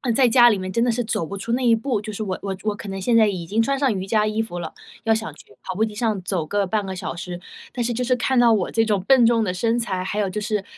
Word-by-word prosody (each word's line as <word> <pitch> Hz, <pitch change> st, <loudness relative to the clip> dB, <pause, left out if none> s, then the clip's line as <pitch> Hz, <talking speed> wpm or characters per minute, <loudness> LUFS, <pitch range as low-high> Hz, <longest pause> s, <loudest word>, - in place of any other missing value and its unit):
在 255 Hz, -3 st, +4 dB
家 240 Hz, 0 st, +7 dB
里 210 Hz, -, +2 dB
面 185 Hz, 0 st, -5 dB
真 230 Hz, -, 0 dB
的 245 Hz, -, +1 dB
是 245 Hz, +1 st, -1 dB
走 215 Hz, -6 st, -2 dB
不 200 Hz, -, -6 dB
出 230 Hz, +4 st, -5 dB
那 255 Hz, -, 0 dB
一 230 Hz, -, +6 dB
步， 235 Hz, -1 st, -1 dB
就 215 Hz, +1 st, -7 dB
是 215 Hz, -, -4 dB
我 185 Hz, -2 st, -4 dB
我 195 Hz, -1 st, -3 dB
我 215 Hz, -1 st, 0 dB
可 205 Hz, -, -9 dB
能 195 Hz, 0 st, -5 dB
现 230 Hz, +3 st, +3 dB
在 220 Hz, -1 st, +5 dB
已 180 Hz, -4 st, -3 dB
经 215 Hz, +6 st, 0 dB
穿 275 Hz, +4 st, 0 dB
上 270 Hz, -5 st, +1 dB
瑜 190 Hz, 0 st, -4 dB
伽 215 Hz, 0 st, +2 dB
衣 215 Hz, +1 st, 0 dB
服 200 Hz, -6 st, -6 dB
了， 160 Hz, -2 st, -6 dB, 0.3 s
要 225 Hz, -, +3 dB
想 220 Hz, 0 st, -3 dB
去 -, -, -17 dB
跑 185 Hz, -, -6 dB
步 215 Hz, -, +1 dB
机 220 Hz, -1 st, -2 dB
上 215 Hz, -3 st, -1 dB
走 175 Hz, -5 st, -2 dB
个 200 Hz, +4 st, 0 dB
半 205 Hz, +1 st, -1 dB
个 190 Hz, 0 st, -5 dB
小 -, -, -5 dB
时， 175 Hz, 0 st, -6 dB, 0.3 s
但 245 Hz, -, -2 dB
是 240 Hz, -, -1 dB
就 250 Hz, -, -3 dB
是 250 Hz, 0 st, +2 dB
看 255 Hz, +1 st, +1 dB
到 235 Hz, -2 st, +5 dB
我 200 Hz, -4 st, 0 dB
这 225 Hz, 0 st, +2 dB
种 205 Hz, -4 st, 0 dB
笨 255 Hz, +2 st, +5 dB
重 230 Hz, -1 st, +3 dB
的 180 Hz, -3 st, -1 dB
身 230 Hz, +5 st, 0 dB
材， 195 Hz, -6 st, -2 dB
还 190 Hz, +3 st, -4 dB
有 200 Hz, -2 st, 0 dB
就 210 Hz, -, -3 dB
是 210 Hz, -1 st, -2 dB
215 Hz, 345 characters per minute, -22 LUFS, 190-230 Hz, 0.3 s, 家